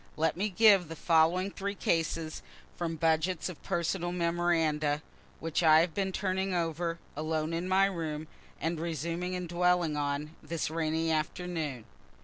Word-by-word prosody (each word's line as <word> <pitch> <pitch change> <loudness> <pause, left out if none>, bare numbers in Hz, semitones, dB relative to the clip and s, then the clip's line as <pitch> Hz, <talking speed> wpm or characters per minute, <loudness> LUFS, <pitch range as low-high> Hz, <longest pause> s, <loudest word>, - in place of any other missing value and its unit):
Let 160 +1 +1
me 200 +4 0
give 200 -3 +5
the 165 - -7
following 170 +4 +3
three 200 +1 -4
cases 165 -3 -1 0.3
from 165 -1 -2
budgets 160 +3 +1
of 180 - -9
personal 175 +1 -1
memoranda, 165 -4 +1 0.4
which 165 +1 -1
I 160 -1 +7
have 165 -1 -1
been 195 -1 -1
turning 190 0 -1
over, 165 0 -1 0.2
alone 155 +1 -1
in 170 +2 -2
my 190 +1 +5
room, 160 -5 -3 0.3
and 165 0 -1
resuming 170 +3 -2
and 180 -1 -4
dwelling 175 -2 +2
on, 145 +2 -2
this 165 -2 -3
rainy 160 0 0
afternoon. 155 -5 -2
165 Hz, 145 wpm, -30 LUFS, 160-180 Hz, 0.4 s, I